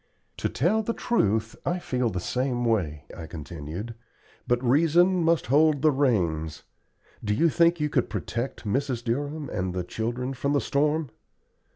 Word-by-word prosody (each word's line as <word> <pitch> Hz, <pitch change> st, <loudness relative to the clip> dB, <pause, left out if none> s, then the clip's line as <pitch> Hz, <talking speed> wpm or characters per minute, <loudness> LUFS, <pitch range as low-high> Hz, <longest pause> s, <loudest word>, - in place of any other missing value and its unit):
"To -, -, -1 dB
tell 190 Hz, -, +1 dB
the 230 Hz, +2 st, -2 dB
truth 110 Hz, -, +1 dB
I 175 Hz, -, 0 dB
feel 125 Hz, -8 st, -1 dB
the 90 Hz, -4 st, -3 dB
same 125 Hz, +4 st, -1 dB
way," 80 Hz, -11 st, 0 dB
I 80 Hz, -, -7 dB
continued, 85 Hz, +6 st, -7 dB, 0.5 s
"but 120 Hz, +1 st, +1 dB
reason 170 Hz, +7 st, +4 dB
must 165 Hz, 0 st, +2 dB
hold 145 Hz, +2 st, +3 dB
the 155 Hz, -, +6 dB
reins. 85 Hz, -, 0 dB, 0.6 s
Do 105 Hz, -1 st, 0 dB
you 165 Hz, +9 st, +4 dB
think 170 Hz, +1 st, +3 dB
you 150 Hz, -, +1 dB
could 130 Hz, -4 st, 0 dB
protect 120 Hz, +1 st, -4 dB
Mrs. 125 Hz, +2 st, -1 dB
Durham 145 Hz, +5 st, -2 dB
and 90 Hz, 0 st, -2 dB
the 90 Hz, -, -1 dB
children 120 Hz, +7 st, -3 dB
from 140 Hz, +2 st, -1 dB
the 145 Hz, -, +3 dB
storm?" 150 Hz, 0 st, 0 dB
125 Hz, 160 wpm, -26 LUFS, 105-150 Hz, 0.6 s, the